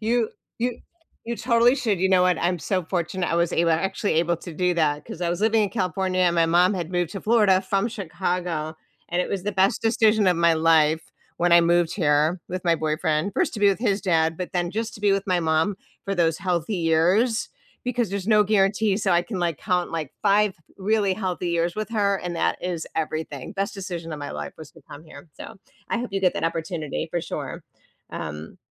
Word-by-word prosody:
you 225 0 +1 0.3
you 240 +1 -1 0.5
you 235 +1 -3
totally 235 +1 +3
should 225 -8 0
you 190 - +3
know 185 -1 +4
what? 180 -2 +2
I'm 175 +1 0
so 185 +2 -1
fortunate 175 +1 -2
I - - 0
was 170 0 +1
able 170 0 +2
a - - +5
actually 190 +3 -1
able 170 +1 +2
to 170 -1 -9
do 180 +2 +1
that, 150 -3 0
'cause - - -9
I 175 - 0
was 175 +2 -3
living 220 0 +3
in 200 - -3
California 185 -2 -1
and 175 -1 +3
my 165 -1 +3
mom 180 +4 +4
had 175 -2 -4
moved 175 -2 0
to 195 - -5
Florida 210 -4 +4
from 195 +3 0
Chicago, 175 -6 -3 0.3
and 175 +1 0
it - - -5
was 195 -2 -3
the 210 - -1
best 190 +1 +2
decision 220 -2 +3
of 180 -2 +3
my 170 0 +4
life 160 -1 +2 0.3
when 175 0 +2
I 170 - +8
moved 170 0 +2
here 155 0 +2
with 185 +1 -5
my 170 -1 +4
boyfriend. 155 +3 -1
First, - - 0
to 210 - -5
be 205 - +6
with 195 - +1
his 205 -4 +1
dad, 165 -3 +1
but 180 +2 -5
then 175 -2 -1
just 225 +3 -3
to - - -11
be 205 -1 +3
with 195 0 -1
my 185 -2 +2
mom 160 +4 +1 0.3
for 195 - -2
those 165 -3 +1
healthy 180 +2 -1
years, 180 +8 +2 0.4
because 245 -4 -1
there's 200 -1 -4
no 210 -1 +6
guarantee, 200 0 +2
so, 205 -2 0
I 175 0 +3
can, 195 +1 -5
like, 170 -3 -1
count 180 -3 -1
like 155 -4 -4
5 205 -1 +3 0.2
really 200 -1 +1
healthy 185 -3 -3
years 170 0 0
with 215 0 -3
her, 200 -3 +1
and 175 -2 -5
that 85 - 0
is 175 -3 -3
everything. 155 -4 -4
Best 195 0 -2
decision 175 -4 -6
of 155 - -5
my 145 - -6
life - - -6
was 155 -2 -10
to 165 - -18
come 145 +3 -10
here, 155 0 -13
so, - - -10 0.3
I - - -1
hope 245 +1 -3
you 195 - -1
get 185 -2 +3
that - - -3
opportunity, 165 -2 -3
for 175 - -1
sure. 165 - -6 0.5
Um, 80 -1 -7
180 Hz, 225 wpm, -24 LUFS, 165-200 Hz, 0.5 s, I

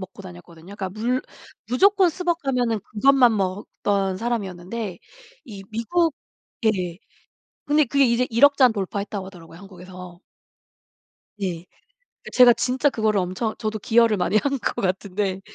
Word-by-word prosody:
먹고 190 +1 -10
다녔거든요. 175 0 -12
그러니까 190 - -4
물 230 +6 -1 0.5
무조건 385 +8 +4
스벅 345 0 -2
가면은 245 -7 -1
그것만 245 +2 +3
먹던 195 0 -2
사람이었는데 200 -3 -4 0.5
이 200 -5 -10
미국 315 +9 0 0.5
예 185 -6 0 0.7
근데 295 +1 +3
그게 275 +2 +3
이제 245 +1 +1
100,000,000 280 +5 +5
잔 255 -3 +6
돌파했다고 200 -1 -4
하더라고요 165 -3 -13
한국에서. 180 -2 -12 1.2
네. 180 -4 -4 0.6
그 - - -9
제가 250 -1 +7
진짜 255 +4 +1
그거를 215 -4 0
엄청 185 +5 -3
저도 215 0 -3
기여를 230 +1 +3
많이 185 +3 0
한 275 +5 +1
것 - - -3
같은데 190 0 -2
215 Hz, 305 characters per minute, -23 LUFS, 190-250 Hz, 1.2 s, 제가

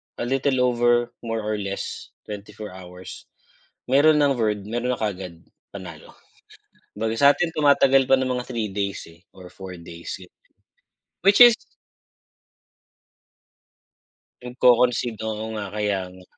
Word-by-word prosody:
a - - -4
little 130 0 +1
over 120 -1 +2
more 115 -2 -4
or 105 0 -2
less 100 -1 -6
24 105 0 -9
hours, 90 -1 -11 0.6
meron 150 +2 +5
ng 140 -1 +3
word 105 -3 0
meron 120 +3 -1
na - - -11
kaagad 90 -5 -5 0.3
panalo. 85 -5 -10 0.8
Kumbaga 110 0 -1
sa'tin 145 +4 +4
tumatagal 135 -3 +4
pa 135 - +6
ng 130 0 -1
mga 125 0 -3
3 110 -3 -3
days, 100 -1 -3
eh, 85 +1 -19 0.2
or 90 -1 -11
4 95 -2 -9
days, 85 +1 -8
gano'n. 90 -1 -17 0.9
Which 200 +1 +5
is 240 -2 +10 2.9
nagko-concede, 125 -2 +2
oo 110 0 -4
nga 105 -2 -4
kaya 105 -2 -1
nga. 95 0 -15
110 Hz, 130 wpm, -23 LUFS, 100-125 Hz, 2.9 s, is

